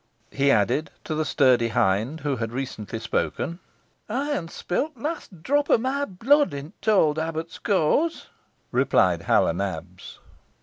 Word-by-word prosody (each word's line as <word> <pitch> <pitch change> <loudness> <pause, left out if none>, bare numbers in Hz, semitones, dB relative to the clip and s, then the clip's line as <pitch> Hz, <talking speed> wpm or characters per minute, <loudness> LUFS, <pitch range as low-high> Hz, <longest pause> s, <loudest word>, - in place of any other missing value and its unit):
he 140 0 +2
added, 125 +6 +2
to 155 - -4
the 155 0 0
sturdy 130 -5 +3
hind 110 +8 0
who 140 -2 -1
had 115 -1 -3
recently 120 -4 -5
spoken. 165 +9 -2 0.5
"Ey'n 265 - -1
spill 180 - -2
t' 280 -7 -24
last 230 - -5
drop 290 +6 +1
o' - - +6
meh 265 +4 -1
blood 265 - +2
i' 140 +3 -7
t' 220 - -1
owd 160 -7 +4
abbut's 160 +1 -4
keawse," 205 - +1 0.5
replied - - +3
Hal - - +3
o' - - +2
Nabs. - - -5
160 Hz, 150 wpm, -25 LUFS, -, 0.5 s, o